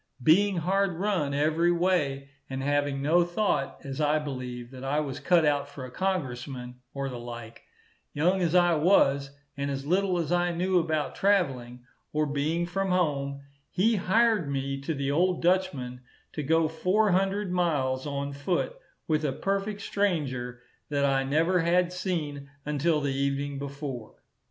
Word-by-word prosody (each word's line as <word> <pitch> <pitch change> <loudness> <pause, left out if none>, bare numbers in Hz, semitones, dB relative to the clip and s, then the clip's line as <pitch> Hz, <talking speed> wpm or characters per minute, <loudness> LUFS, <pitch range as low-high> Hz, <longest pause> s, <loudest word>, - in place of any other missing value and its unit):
Being 190 +6 +4
hard 190 +3 +1
run 180 -5 0
every 160 +4 +2
way, 160 -6 0 0.2
and 135 0 -4
having 145 -1 0
no 170 +4 +4
thought, 175 -6 -1
as 135 +2 -4
I 150 +1 +3
believe, 125 -4 -5
that 130 -1 -9
I 140 +3 0
was 140 -4 -3
cut 175 -3 +3
out 145 -1 +1
for 140 -2 -8
a 125 - -10
Congressman 130 -8 -3
or 140 0 -3
the 125 -2 -6
like, 120 -1 -8 0.5
young 180 +6 +1
as 170 0 +1
I 175 -1 +5
was, 140 -4 +3 0.3
and 140 0 -2
as 135 0 -4
little 185 +3 +2
as 165 -2 -2
I 175 0 +2
knew 180 +1 +2
about 155 -3 -1
travelling, 130 -11 0 0.3
or 155 0 +2
being 150 +4 0
from 195 +2 -2
home, 140 -6 0 0.3
he 215 +5 +2
hired 215 -3 +2
me 135 0 -2
to 155 +3 -2
the 140 0 -1
old 180 +4 +1
Dutchman, 155 -9 0 0.3
to 150 - -3
go 160 +3 +2
four 185 +6 +2
hundred 195 +1 +1
miles 145 -7 0
on 140 0 -3
foot, 175 - -1 0.3
with 155 -1 +1
a 145 - +1
perfect 195 +7 -2
stranger 130 -13 -1 0.3
that 140 -1 +1
I 135 -1 +2
never 160 +7 +2
had 175 +1 +2
seen 150 -7 -3 0.2
until 150 +1 +1
the 140 -1 -1
evening 140 +1 -1
before. 140 -5 -6
150 Hz, 160 wpm, -28 LUFS, 140-180 Hz, 0.5 s, I